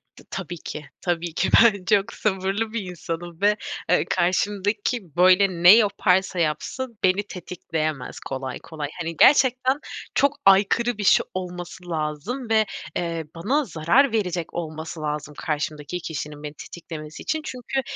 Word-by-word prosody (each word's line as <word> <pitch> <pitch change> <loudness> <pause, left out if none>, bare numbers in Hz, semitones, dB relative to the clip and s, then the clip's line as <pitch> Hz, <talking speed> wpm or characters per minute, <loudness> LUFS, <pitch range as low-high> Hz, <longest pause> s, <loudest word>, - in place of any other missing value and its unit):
T - - -16
tabii 175 -2 -5
ki. 155 -1 -7 0.2
Tabii 175 -2 -2
ki. 190 - 0
Ben 200 -5 +3
çok 205 -2 +2
sabırlı 200 +2 -1
bir 230 - -1
insanım 170 0 -6
ve, 210 +1 +4 0.3
eee, - - +3
karşımdaki, 200 - 0
böyle, 185 +2 +6 0.2
ne 175 - +11
yaparsa 190 -4 +2
yapsın 220 - -2
beni 185 +2 +3
tetikleyemez 160 -7 -4
kolay 130 -1 -5
kolay. 150 -3 -6
Hani, 165 -1 -4
gerçekten 260 0 +5 0.4
çok 280 +1 +3
aykırı 205 +4 +4
bir 210 - -3
şey 195 - +5
olması 180 -1 -6
lazım 165 - -3
ve, 220 -1 +4 0.3
eee, 165 -2 -2
bana 275 - 0
zarar 185 - +3
verecek 180 -6 -1
olması 160 -1 -5
lazım 150 -1 -3
karşımdaki 150 +2 -3
kişinin 150 -2 -6
beni 150 - -6
tetiklemesi 155 -1 -9
için. 315 0 -1
Çünkü 260 +2 -3
180 Hz, 140 wpm, -24 LUFS, 160-210 Hz, 0.4 s, ne